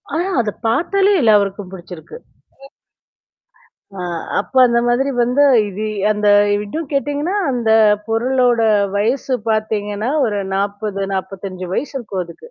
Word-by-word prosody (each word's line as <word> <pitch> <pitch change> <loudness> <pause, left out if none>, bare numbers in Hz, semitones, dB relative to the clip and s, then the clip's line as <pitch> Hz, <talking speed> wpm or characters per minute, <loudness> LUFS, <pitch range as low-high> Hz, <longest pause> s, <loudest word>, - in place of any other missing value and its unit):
ஆனா 340 +3 0 0.2
அத 220 - -2 0.2
பாத்தாலே 385 - +2
எல்லாருக்கும் 205 -4 +2
பிடிச்சிருக்கு. 180 - -10 1.8
அ 180 - -5 0.3
அப்ப 205 - -5
அந்த 235 -1 +1
மாதிரி 265 +3 +1
வந்து 250 +4 +2 0.2
இது 205 +2 -5 0.3
அந்த 210 0 0 0.3
இதும் 210 +10 -4
கேட்டீங்கன்னா, 290 +6 -1 0.2
அந்த 235 -3 -1 0.4
பொருளோட 245 +1 +1 0.3
வயசு 250 +5 0
பாத்தீங்கன்னா 215 +1 -2 0.2
ஒரு 205 -2 -2
40 200 0 -2
45 190 -1 -6
வயசு 290 +4 -3
இருக்கும் 205 -6 -4
அதுக்கு. 170 - -14
220 Hz, 115 wpm, -18 LUFS, 200-255 Hz, 1.8 s, பாத்தாலே